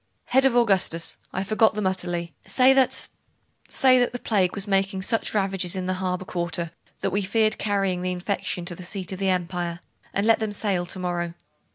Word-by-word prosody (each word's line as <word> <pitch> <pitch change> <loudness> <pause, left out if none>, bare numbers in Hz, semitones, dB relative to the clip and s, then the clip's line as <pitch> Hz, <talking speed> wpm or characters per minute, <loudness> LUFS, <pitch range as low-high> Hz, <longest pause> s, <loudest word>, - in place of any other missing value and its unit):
'Head 265 +1 +4
of 265 -3 +3
Augustus! 195 -8 +2
I 190 - -2
forgot 215 +2 +3
them 210 -2 -2
utterly. 175 -3 -2
Say 260 +1 +5
that 265 -1 +3 0.6
say 255 -1 +4
that 245 - +1
the - - -2
plague 195 -7 +1
was 200 -1 -3
making 195 -1 +1
such 225 +1 0
ravages 195 -3 0
in 185 -1 -3
the 185 - 0
harbour 185 0 -2
quarter 170 -2 -2 0.3
that 195 - 0
we 200 +3 +1
feared 215 +3 +1
carrying 195 -3 0
the 185 0 -1
infection 180 -1 -3
to 175 - -1
the 175 - -10
seat 185 +1 -4
of 190 - -5
the 195 -1 +1
empire; 175 -1 -2 0.3
and 200 - 0
let 225 0 +5
them 215 -2 -2
sail 190 -4 -1
to 185 - -7
morrow. 175 -2 -3
190 Hz, 200 wpm, -25 LUFS, 180-210 Hz, 0.6 s, Say